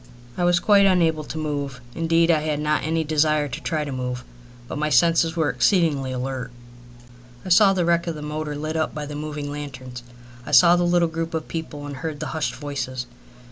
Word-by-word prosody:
I 175 - 0
was 175 0 +4
quite 200 0 +5
unable 165 -4 +2
to 160 - -7
move. 145 -4 -3
Indeed, 165 +1 +2
I 160 - +3
had 150 -1 -2
not 150 0 +1
any 160 +1 0
desire 150 -1 +2
to - - -6
try 155 -2 -1
to 145 - -5
move. 125 -1 -4 0.4
But 145 - -5
my 150 0 0
senses 165 +4 +3
were 160 -3 +1
exceedingly 155 -9 +2
alert. 130 0 -4 1.0
I - - -5
saw 195 +2 +6
the 180 -3 0
wreck 170 0 +1
of 165 - -2
the 150 - -7
motor 150 0 -4
lit 155 +2 -4
up 160 0 -1
by 150 -1 -4
the 145 - -7
moving 150 -1 -5
lanterns. 130 -4 -7 0.4
I - - -8
saw 175 -1 +7
the 175 0 +1
little 175 -1 +3
group 165 0 -4
of 160 - -3
people 155 -3 -6
and 140 -2 -7
heard 155 0 -5
the 150 -3 -4
hushed 155 -2 -2
voices. 135 -3 -4
155 Hz, 210 wpm, -23 LUFS, 145-165 Hz, 1.0 s, saw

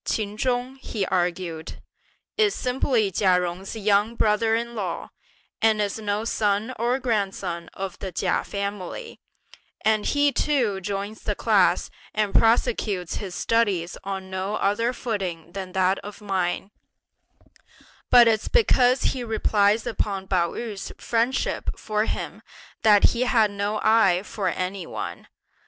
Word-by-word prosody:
"Ch'in 210 -1 -2
Chung," 250 +3 -1
he 215 -6 -3
argued, 175 -3 -2 0.6
"is 425 -2 +3
simply 250 -5 +1
Chia 185 -1 +3
Jung's 180 +4 -4
young 210 +1 +2
brother 220 0 +2
in 235 +1 -3
law, 195 -6 -4 0.5
and 220 -1 +4
is 205 +1 -1
no 210 0 -2
son 215 +1 0
or 240 +2 +1
grandson 195 -8 -2
of 195 -1 -5
the 190 - -5
Chia 180 +1 0
family, 200 - -5 0.7
and 215 -1 +2
he 285 0 +3
too 245 -11 +1
joins 200 +2 -4
the - - -2
class - - +2 0.2
and 210 -2 0
prosecutes 220 -6 +2
his 190 -4 -6
studies 200 -7 +1
on 190 -1 -5
no 190 +2 -2
other 215 +4 +1
footing 190 -10 -4
than 185 -1 -6
that 190 +1 +2
of 205 +1 -9
mine; 195 -1 -2 1.4
but 240 -1 +8
it's 220 -2 +2
because 255 - +3
he 255 -2 0
relies 215 -1 +2
upon 195 -3 -2
Pao 175 -3 +1
yü's 215 -5 -5
friendship 235 +3 -1
for 215 -1 -1
him - - -4 0.4
that 210 -2 +6
he 235 - -2
has 225 -4 +3
no 205 +1 -2
eye 200 -5 +4
for 205 -2 -3
any 185 -1 -3
one. - - -6
210 Hz, 140 wpm, -24 LUFS, 190-230 Hz, 1.4 s, but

